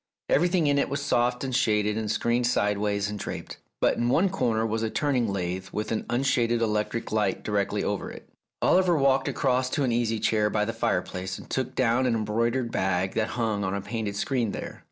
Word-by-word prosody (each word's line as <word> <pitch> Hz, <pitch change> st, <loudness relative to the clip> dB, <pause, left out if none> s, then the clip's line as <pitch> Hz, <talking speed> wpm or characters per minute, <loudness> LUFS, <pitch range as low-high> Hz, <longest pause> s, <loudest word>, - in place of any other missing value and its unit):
Everything 175 Hz, +2 st, +3 dB
in 145 Hz, -1 st, +3 dB
it -, -, 0 dB
was 140 Hz, +1 st, -2 dB
soft 125 Hz, -3 st, +1 dB
and 130 Hz, -2 st, -2 dB
shaded 105 Hz, -5 st, +2 dB
and 110 Hz, -1 st, -2 dB
screened 120 Hz, +3 st, +1 dB
sideways 105 Hz, -3 st, +1 dB
and 105 Hz, 0 st, -5 dB
draped. -, -, -6 dB, 0.2 s
But -, -, +2 dB
in 120 Hz, -, +1 dB
one 185 Hz, +9 st, +3 dB
corner 115 Hz, -11 st, 0 dB
was 110 Hz, 0 st, -1 dB
a 110 Hz, -, 0 dB
turning 125 Hz, -5 st, 0 dB
lathe 95 Hz, 0 st, -3 dB
with 105 Hz, -, -3 dB
an 110 Hz, -, -2 dB
unshaded 120 Hz, -2 st, +1 dB
electric 110 Hz, +1 st, -1 dB
light 105 Hz, -3 st, 0 dB
directly 100 Hz, -2 st, 0 dB
over -, -, -2 dB
it. -, -, -11 dB, 0.4 s
Oliver 180 Hz, -3 st, +4 dB
walked 135 Hz, -1 st, +3 dB
across 130 Hz, -2 st, +1 dB
to 145 Hz, -, 0 dB
an 125 Hz, -, +1 dB
easy 115 Hz, -1 st, 0 dB
chair 105 Hz, 0 st, +2 dB
by 105 Hz, 0 st, 0 dB
the 115 Hz, -, -3 dB
fire -, -, 0 dB
place, 95 Hz, +1 st, -5 dB
and -, -, -11 dB
took 130 Hz, 0 st, -3 dB
down 125 Hz, 0 st, +2 dB
an 120 Hz, -, +2 dB
embroidered 115 Hz, +3 st, 0 dB
bag 95 Hz, 0 st, 0 dB
that 110 Hz, -1 st, 0 dB
hung 110 Hz, -4 st, 0 dB
on 95 Hz, 0 st, -1 dB
a 100 Hz, -, -2 dB
painted 105 Hz, -1 st, -4 dB
screen 115 Hz, 0 st, -1 dB
there. -, -, -6 dB
115 Hz, 210 wpm, -26 LUFS, 105-130 Hz, 0.4 s, Oliver